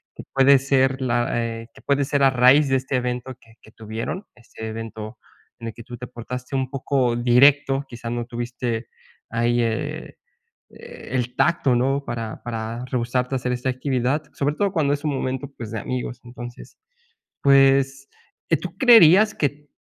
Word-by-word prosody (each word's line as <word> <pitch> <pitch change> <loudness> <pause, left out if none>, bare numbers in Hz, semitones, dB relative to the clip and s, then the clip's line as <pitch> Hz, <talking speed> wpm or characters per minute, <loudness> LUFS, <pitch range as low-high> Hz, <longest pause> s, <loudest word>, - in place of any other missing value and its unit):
que - - -9
puede 135 +1 +6
ser 135 0 +1
la, 120 -2 0 0.2
eh, 115 0 -6
que - - -16
puede 140 0 +1
ser 140 0 0
a 135 - +6
raíz 130 +3 +5
de 135 - +3
este 130 +1 -3
evento 125 0 -3
que 115 -1 -22
que 110 - -18
tuvieron, 110 - -6
este 115 -1 -10
evento 110 -1 -7 0.4
en 115 - -6
el 110 - -5
que 115 - -11
tú 120 +1 -9
te 125 - -8
portaste 125 +2 -7
un 130 -1 -1
poco 135 -3 0
directo, 135 +3 +4
quizás 120 -1 -7
no 120 0 -3
tuviste 120 -1 -4 0.4
ahí, 120 +1 +1
eh, 130 +7 -3 0.5
el 130 - -5
tacto 155 -7 +2
¿no?, 135 +3 0
para 115 -2 -5
para 115 +1 -5
rehusarte 125 +1 -1
a - - +2
hacer 125 0 -2
esta 125 +1 -2
actividad, 130 +2 -1
sobre 145 +1 -1
todo 200 +2 0
cuando 145 -4 +1
es 145 - -4
un 150 - 0
momento, 130 +1 -3
pues, 115 -3 -7
de 110 - -3
amigos, 125 0 -4
entonces, 120 0 -10 0.6
pues, 135 0 +4 0.4
eh, 165 - +4
¿tú 180 +3 -8
creerías 215 -3 +7
que 145 0 -2
125 Hz, 175 wpm, -23 LUFS, 120-140 Hz, 0.6 s, creerías